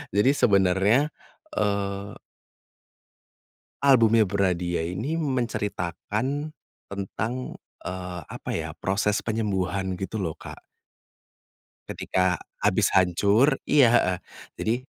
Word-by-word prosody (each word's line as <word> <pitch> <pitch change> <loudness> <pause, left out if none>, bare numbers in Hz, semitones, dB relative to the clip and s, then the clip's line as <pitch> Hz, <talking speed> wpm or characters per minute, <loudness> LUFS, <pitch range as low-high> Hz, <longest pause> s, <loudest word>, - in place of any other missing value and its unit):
jadi 105 +7 +5
sebenarnya, 100 +6 +3 0.5
eee 100 -1 -1 1.7
albumnya 115 -5 +5
Bernadya 90 -4 0
ini 145 - -2
menceritakan 125 - -2 0.3
tentang, 100 +4 -4 0.5
eee, 90 -1 -5
apa - - -6
ya - - -3
proses 100 +2 +1
penyembuhan 95 -4 -1
gitu 100 +1 -3
loh, 80 -2 -4
Kak. 360 - -10 1.3
Ketika - - 0 0.2
habis - - +3
hancur 100 - +4
iya, 145 -4 +6
heeh. 90 -4 +2 0.4
Jadi, 110 +2 +1
100 Hz, 90 wpm, -25 LUFS, 95-120 Hz, 1.7 s, iya